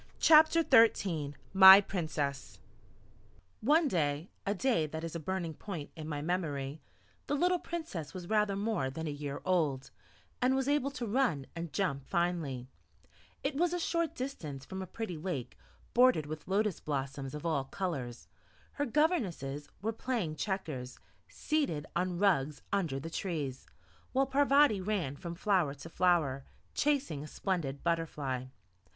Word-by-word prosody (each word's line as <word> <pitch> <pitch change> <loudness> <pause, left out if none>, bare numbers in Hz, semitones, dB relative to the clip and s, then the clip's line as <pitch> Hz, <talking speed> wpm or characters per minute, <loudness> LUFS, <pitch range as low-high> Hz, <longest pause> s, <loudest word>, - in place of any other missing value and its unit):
CHAPTER 315 +1 +6
XIII 170 -10 +4 0.2
MY 190 +1 +11
PRINCESS 150 -8 -3 1.0
One 300 +7 +4
day 155 - -1 0.2
a 200 - +1
day 205 -8 +1
that 160 +2 -6
is 165 0 -5
a - - -2
burning 170 0 -3
point 165 -3 -7
in 155 -2 -7
my 145 -1 -3
memory 150 -4 -2 0.5
the 290 - 0
little 360 +4 +2
Princess 315 - -5
was 180 -2 -8
rather 210 -1 +2
more 200 -10 -1
than 160 +5 -5
a 155 - -2
year 145 -1 -5
old, 145 -7 0 0.5
and 255 +1 +3
was 265 0 0
able 285 -1 +2
to 255 -4 -5
run 220 - +1
and 165 -1 -5
jump 135 0 -1
finely; 165 -8 -1 0.8
it 275 - 0
was 340 +4 +1
a 355 - -1
short 335 -1 -1
distance 155 - -5
from 190 +4 -6
a 190 - -6
pretty 185 -4 -5
lake 150 -7 -4 0.4
bordered 250 - +5
with 155 0 -7
lotus 200 0 +1
blossoms 135 -1 -4
of 150 - -7
all 155 -5 0
colours; 135 -9 -4 0.4
her 290 - -2
governesses 195 - 0
were 225 +1 0
playing 220 -10 -2
checkers, 150 -7 -4 0.3
seated 280 - -1
on 180 0 0
rugs 155 -7 +1
under 165 -9 0
the 165 +4 -7
trees, 150 -9 -4 0.5
while 270 +1 +3
Parvati 275 -5 +4
ran 185 -8 -1
from 170 +3 -7
flower 180 -6 +1
to 145 +4 -10
flower, 165 -7 +2 0.3
chasing 275 - 0
a - - -8
splendid 150 -6 -3
butterfly. 150 -6 -1
175 Hz, 150 wpm, -32 LUFS, 145-225 Hz, 1.0 s, MY